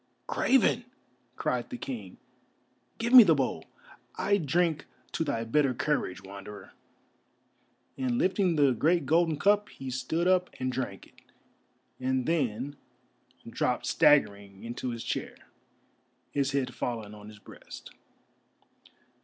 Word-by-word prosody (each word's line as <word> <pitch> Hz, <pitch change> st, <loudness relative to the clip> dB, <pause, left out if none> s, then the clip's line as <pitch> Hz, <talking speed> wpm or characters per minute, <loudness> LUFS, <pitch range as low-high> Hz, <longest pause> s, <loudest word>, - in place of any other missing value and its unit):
"Craven!" 250 Hz, -2 st, +2 dB, 0.5 s
cried -, -, -2 dB
the 250 Hz, -, -6 dB
King, 110 Hz, -, -7 dB, 0.8 s
"give 235 Hz, +2 st, -2 dB
me 255 Hz, -, +13 dB
the 170 Hz, -8 st, +5 dB
bowl. 125 Hz, -, -2 dB, 0.5 s
I 200 Hz, 0 st, +2 dB
drink 160 Hz, -1 st, 0 dB, 0.3 s
to -, -, -1 dB
thy 115 Hz, -7 st, -2 dB
better 130 Hz, +2 st, +1 dB
courage, 120 Hz, -10 st, -1 dB
Wanderer," 100 Hz, 0 st, -10 dB, 1.3 s
and 125 Hz, -2 st, 0 dB
lifting 185 Hz, -, +2 dB
the 145 Hz, -3 st, +4 dB
great 155 Hz, +6 st, +2 dB
golden 160 Hz, +1 st, +2 dB
cup, 205 Hz, +4 st, +2 dB
he 135 Hz, -1 st, -8 dB
stood 145 Hz, +7 st, -1 dB
up 185 Hz, -1 st, +3 dB
and 130 Hz, 0 st, -1 dB
drank 125 Hz, -7 st, -4 dB
it, -, -, -23 dB, 0.8 s
and 130 Hz, 0 st, 0 dB
then 140 Hz, -3 st, -1 dB, 0.7 s
dropped -, -, -1 dB
staggering 100 Hz, -8 st, +2 dB
into 120 Hz, +2 st, -4 dB
his 115 Hz, -1 st, -5 dB
chair, -, -, -4 dB, 1.0 s
his 140 Hz, -1 st, 0 dB
head 130 Hz, -3 st, -1 dB
fallen 110 Hz, -4 st, -4 dB
on 105 Hz, 0 st, -12 dB
his 105 Hz, 0 st, -12 dB
breast. -, -, -12 dB
135 Hz, 125 wpm, -29 LUFS, 115-165 Hz, 1.3 s, me